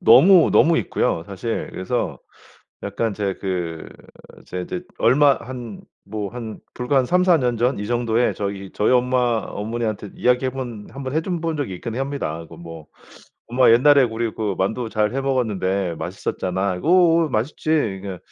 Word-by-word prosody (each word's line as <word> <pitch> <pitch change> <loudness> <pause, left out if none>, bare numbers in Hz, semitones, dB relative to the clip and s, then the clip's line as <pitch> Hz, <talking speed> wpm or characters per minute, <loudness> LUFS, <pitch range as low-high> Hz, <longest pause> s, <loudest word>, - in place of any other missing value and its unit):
너무 185 -1 +7
너무 165 0 +5
있고요 80 - -1
사실. 100 +4 -4
그래서 95 - -3 0.7
약간 105 +2 -2
제 100 -1 -2
그 90 -4 -4 0.6
제 90 - -5
이제 175 - -5 0.2
얼마 140 +1 +5
한 120 -3 -8 0.3
뭐 105 -1 -4
한 115 -1 -7 0.2
불과 125 +3 0
한 130 - +3
3-4 180 0 +4
년 125 -3 0
전 125 +2 +1
이 105 - -4
정도에 120 0 +1
저기 100 -1 -4
저희 105 - +2
엄마 125 +1 +2 0.3
어머니한테 110 -1 -4
이야기해 125 +1 +1
본 120 -5 -6
한번 135 +1 -6
해줘 165 +4 -1
본 165 -1 -2
적이 140 -10 -3
있긴 115 +5 -6
합니다. 135 - -3
그 - - -14
뭐 80 -2 -10 0.6
"엄마 125 +1 +4
옛날에 140 +4 +6
우리 115 -1 -2
그 105 -3 -2
만두 110 +5 -1
잘 105 0 0
해 135 - 0
먹었는데 100 -9 -1
맛있었잖아." 90 +2 -3
"어어 170 -2 +4
맛있지." 130 +5 -3
그러니까 100 - -1
115 Hz, 305 characters per minute, -22 LUFS, 100-135 Hz, 0.7 s, 너무